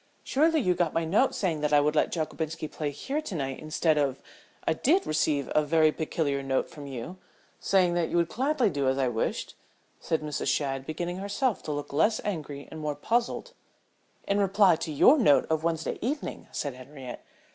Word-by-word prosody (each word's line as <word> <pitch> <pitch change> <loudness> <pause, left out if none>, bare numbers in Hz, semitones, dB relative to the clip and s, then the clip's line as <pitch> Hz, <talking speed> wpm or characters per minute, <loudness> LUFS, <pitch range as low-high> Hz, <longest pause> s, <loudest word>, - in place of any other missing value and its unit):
"Surely, 315 +3 +3
you 185 -9 +2
got 175 -3 -1
my 165 0 +1
note 210 +11 +2
saying 165 -6 -1
that 150 0 0
I 145 - +6
would 150 +1 +1
let - - +2
Jockobinski 160 -1 -3
play 150 -2 -3
here 270 - -3
to 230 - -6
night 135 -3 -3
instead 155 0 +1
of 135 -2 0 0.2
" - - -28
"I - - +4
did 320 - +2
receive 155 -3 0
a 155 - +4
very 155 +1 +4
peculiar 150 -3 -1
note 135 -1 -1
from 145 -2 -9
you 135 +7 -6 0.4
saying 185 -3 +3
that 175 -2 0
you - - 0
would 170 -1 +3
gladly 260 - +1
do 140 -3 -1
as 130 0 +2
I 135 -1 +2
wished," 110 -2 -2 0.5
said 160 - -1
Mrs. 150 -1 -3
Shadd, 135 -2 -1
beginning 175 +3 -3
herself 205 +5 -1
to 155 - -5
look 145 -1 -5
less 210 +9 +3
angry 150 -8 -4
and 160 - -7
more 150 -1 -2
puzzled. 240 - -1 0.7
"In 200 +1 +2
reply 195 -2 +4
to 160 - -4
your 260 - +6
note 145 - +5
of 160 0 +1
Wednesday 165 -1 -1
evening," 285 +6 -3
said 145 -3 -3
Henriette. 130 0 -9
160 Hz, 200 wpm, -28 LUFS, 145-195 Hz, 0.7 s, I